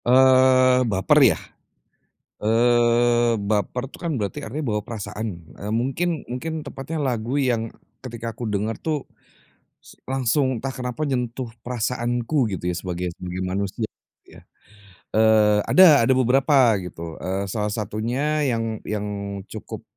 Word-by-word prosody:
Eee, 130 0 +5
baper 105 +10 +3
ya, 110 - +5 1.1
eee, 120 +1 +3
baper 105 +4 -1
tuh 135 - -14
kan 170 - -1
berarti 100 -3 -4
artinya 145 +8 -5
bawa 105 -2 -1
perasaan, 105 -5 -6 0.2
eee, 105 - -4
mungkin 135 +8 -1
mungkin 155 +5 -5
tepatnya 145 +4 -5
lagu 125 -2 -1
yang, 120 -5 0
eee, - - -23 0.2
ketika 115 -2 -6
kudengar 110 -1 -2
tuh, 155 -4 -2 0.7
s - - -17
langsung 130 -1 0
entah 135 - -3
kenapa 125 +2 -5
nyentuh 125 -1 -2 0.2
perasaanku 120 +1 -1
gitu 90 -1 -3
ya, 90 - -1
sebagai 90 0 -3
sebagai 90 0 -6
manusia 100 +4 -2 0.4
ya. - - -16 0.7
Eee, 110 -1 +4
ada 155 -10 +7
ada 130 - +4
beberapa 130 -2 +4
gitu, 85 -3 -8
eee, 95 +1 -3
salah 105 +1 -1
satunya 125 +8 -1
yang 115 -1 -2
yang 105 -1 -3 0.4
cukup, 110 - -8
120 Hz, 130 wpm, -23 LUFS, 105-130 Hz, 1.1 s, ada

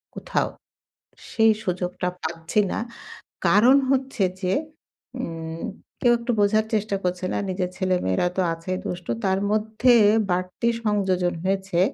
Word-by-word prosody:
কোথাও, - - -1 0.8
সেই 225 -1 +4
সুযোগটা 180 -1 -2 0.2
পাচ্ছি 165 +5 -1
না। - - -2 0.7
কারণ 235 +7 +6 0.2
হচ্ছে 265 -5 0 0.2
যে, 185 0 +1 0.7
উম 165 0 -5 0.4
কেউ 240 -1 +5
একটু 235 +1 -2
বোঝার 215 +2 +3
চেষ্টা 210 -1 0
করছে 180 0 -1
না - - 0
নিজের 185 -1 -1
ছেলে-মেয়েরা 180 - +1
তো - - +3
আছেই 185 +3 -4
দুষ্টু। 180 -1 -4
তার 190 0 +2
মধ্যে 220 +3 +3 0.4
বাড়তি 185 +6 -1 0.2
সংযোজন 190 -4 +1
হয়েছে। 190 -2 0
190 Hz, 125 wpm, -24 LUFS, 180-215 Hz, 0.8 s, কারণ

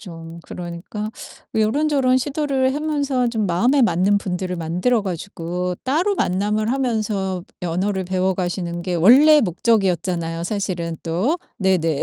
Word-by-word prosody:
좀 165 -3 -10
그러니까 180 +5 -6 0.5
요런저런 260 +3 +2
시도를 275 -1 0
하면서 285 -4 0
좀 225 -3 -1
마음에 240 +11 +3
맞는 195 0 +3
분들을 180 -1 -3
만들어 180 +8 0
가지고 180 -1 -4
따로 335 +10 +1
만남을 210 - 0
하면서 215 -8 -1 0.2
언어를 185 +3 -1
배워가시는 180 -1 -1
게 180 0 -2
원래 270 - +7
목적이었잖아요 175 - 0
사실은 175 -4 -3
또. 185 - 0 0.2
네네. 170 -6 +1
195 Hz, 310 characters per minute, -21 LUFS, 175-250 Hz, 0.5 s, 원래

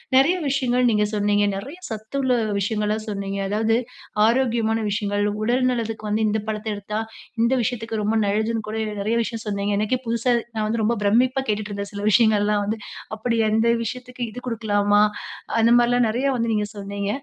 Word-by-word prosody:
நெறைய 275 +7 +5
விஷயங்கள் 250 -2 +2
நீங்க 210 -2 +2
சொன்னீங்க. 205 0 +2
நெறைய 270 - -7
சத்துள்ள 245 +5 -2 0.3
விஷயங்களா 210 +1 0
சொன்னீங்க. 200 -1 -3
அதாவது 220 +2 +2 0.5
ஆரோக்கியமான 230 -2 +2
விஷயங்கள், 205 0 0 0.2
உடல் 245 +4 +2
நலத்துக்கு 225 -3 -3
வந்து 215 +1 +1
இந்த 215 +1 +1
பழத்த 215 0 -3
எடுத்தா, 210 +1 -4 0.4
இந்த 235 +3 +3
விஷயத்துக்கு 225 -2 -2
ரொம்ப 215 +2 +1
நல்லதுன்னு 220 +2 0
கூட - - -5 0.3
நெறைய 220 +3 0
விஷயம் 225 0 -5
சொன்னீங்க. 200 0 -1
எனக்கே 215 +4 0
புதுசா 235 +2 +1 0.2
நான் 215 -1 0
வந்து 225 +1 -1
ரொம்ப 230 +3 +2
பிரமிப்பா 255 +6 +3
கேட்டுட்ருந்தேன், 205 -1 -3
சில 200 0 -5
விஷயங்கள்லாம் 210 -2 +3
வந்து. 220 +2 -2 0.4
அப்படி 230 +2 -1
அந்த 225 +2 +3 0.2
விஷயத்துக்கு 250 +2 -6
இது 245 - -7
குடுக்கலாமா, 205 -3 +2 0.6
அந்த 230 +1 +5
மாரிலாம் 240 0 +3
நெறையா 255 +5 +1
வந்து 230 -1 0
நீங்க 210 -1 0
சொன்னீங்க. 200 0 -4
220 Hz, 160 wpm, -23 LUFS, 205-235 Hz, 0.6 s, நெறைய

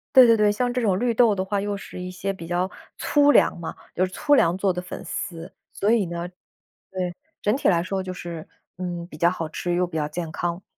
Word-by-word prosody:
对 260 -1 +10
对 230 -1 +6
对， 210 -1 +4
像 245 +4 0
这 250 - 0
种 195 -5 +2
绿 240 0 +1
豆 225 -2 +4
的 190 -1 -1
话， 200 +1 -1
又 205 0 -2
是 180 - -8
一 180 - -5
些 190 +2 -3
比 170 -3 -9
较 180 +2 0 0.3
粗 290 -1 +4
粮 - - +4
嘛。 165 - -5 0.2
就 185 - +3
是 185 - -7
粗 290 +9 +1
粮 170 -8 +3
做 190 -1 +1
的 180 - -3
粉 180 - -8
丝， 170 +1 -5 0.2
所 205 - +1
以 230 -4 +3
呢 170 0 -4 0.6
对， 180 -2 -3 0.3
整 210 - +2
体 275 - +1
来 170 -3 +4
说， 190 +1 -2
就 185 0 -5
是， 170 -3 -7 0.3
嗯， 175 -2 -4
比 150 - -11
较 170 +2 +4
好 165 -3 -4
吃 175 +2 -2
又 180 +1 +2
比 170 -2 -7
较 150 -1 0
健 160 +1 -5
康。 175 +2 -2
185 Hz, 260 characters per minute, -24 LUFS, 175-205 Hz, 0.6 s, 对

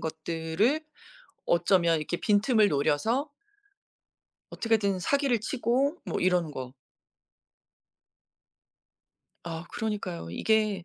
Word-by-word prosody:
것들을 160 - -1 0.7
어쩌면 170 -1 +3
이렇게 155 +3 -3
빈틈을 215 +1 +3
노려서 210 - 0 1.2
어떻게든 210 -4 0
사기를 275 +3 +1
치고 265 +6 0
뭐 - - -3
이런 180 -3 +2
거. 130 -3 -7 2.7
아 165 0 -6
그러니까요. 205 - -4
이게. 210 - +1
195 Hz, 200 characters per minute, -28 LUFS, 160-225 Hz, 2.7 s, 어쩌면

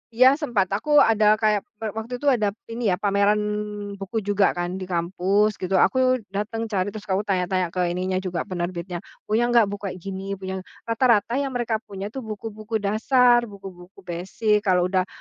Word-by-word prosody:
Iya, 255 +4 +6
sempat. 240 - 0
Aku 295 +8 +3
ada 215 -1 +4
kayak 215 -2 +2 0.2
pe 225 - -3
waktu 235 +3 -5
itu 290 - -3
ada 220 -7 +3 0.2
ini 230 -2 -1
ya, 180 - 0
pameran 200 +1 +2 0.6
buku 200 +3 -3
juga 205 -1 +2
kan 175 +1 -3
di 190 - -5
kampus 185 +4 +1
gitu, 185 0 0
aku 255 -1 +3 0.2
datang 225 +3 -2
cari, 200 -2 -1
terus 210 +1 -9
aku 195 +1 0
tanya-tanya 185 -3 0
ke 185 - -4 0.2
ininya 185 +1 -1
juga 185 -2 -3
penerbitnya, 175 -1 -4 0.2
punya 225 +3 +1
nggak 240 -1 +5
buku 205 0 -5
kayak 185 - -5
gini, 195 0 -4
punya 190 0 -5
ng - - -10 0.2
rata-rata 230 +1 +2
yang 275 -2 -3
mereka 235 -2 0
punya 200 -1 -7
tuh, 265 - -5
buku-buku 215 +1 -6
dasar, 240 +3 +4
buku-buku 195 -2 -12
basic, 190 +5 0
kalau 180 -1 +4
udah 185 -1 +1
205 Hz, 180 wpm, -24 LUFS, 190-225 Hz, 0.6 s, Iya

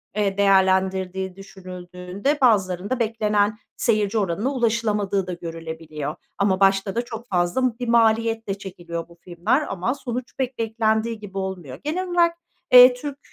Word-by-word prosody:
eee, 200 -2 0
değerlendirdiği 190 -1 +2
düşünüldüğünde 185 +5 -5
bazılarında 205 -1 +2
beklenen 215 -2 +1 0.2
seyirci 215 -2 +1
oranına 200 +4 0
ulaşılamadığı 215 -5 0
da 180 - -3
görülebiliyor 160 -3 -6 0.2
ama 195 -2 +2
başta 195 0 +2
da 235 - +1
çok 235 0 -8
fazla 225 +7 0
bir 245 - -3
maliyetle 225 -2 +2
çekiliyor 175 -4 -7
bu 170 - -16
filmler 185 - 0
ama 195 +7 -1
sonuç 250 -2 -5
pek 260 -1 -2
beklendiği 220 0 0
gibi 200 -2 -9
olmuyor. 180 -9 -5
Genel 360 +5 -2
olarak, 340 -1 +2 0.4
eee, 250 0 +10
Türk 280 +3 -6
205 Hz, 135 wpm, -23 LUFS, 185-230 Hz, 0.4 s, eee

